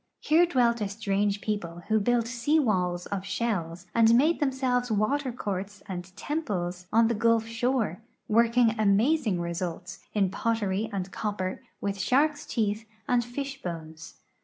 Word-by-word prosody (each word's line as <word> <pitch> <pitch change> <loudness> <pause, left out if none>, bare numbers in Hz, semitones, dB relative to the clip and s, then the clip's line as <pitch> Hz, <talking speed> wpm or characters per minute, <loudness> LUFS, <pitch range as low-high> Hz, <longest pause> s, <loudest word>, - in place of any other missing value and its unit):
Here 335 +3 +4
dwelt 240 -6 +2
a 205 - 0
strange 205 -1 0
people 175 -5 -3
who 220 0 +3
built 235 +2 +2
sea 250 +6 +1
walls 180 - +1
of 195 -2 -3
shells 180 -6 -2
ajid 230 0 +6
made 305 +7 +3
themselves 260 -3 0
water 255 +6 +1
courts 200 -3 -5
and 180 -3 -5
temples 180 - -3
on 225 +1 +5
the 235 - +1
gulf 230 0 +2
shore, 230 -3 -1 0.3
working 230 +1 +4
amazing 215 - +3
results, 175 +1 -4 0.2
in 195 -3 +2
potteiy 220 -2 -1
and 190 -2 -4
cop 210 -2 -3
])cr, 185 0 -3 0.2
with 200 -1 -2
shark's 290 +8 +2
teeth 215 -1 -1 0.2
and 245 -1 +3
fish 270 +3 -5
bones. 165 -1 -7
215 Hz, 150 wpm, -27 LUFS, 190-245 Hz, 0.3 s, ajid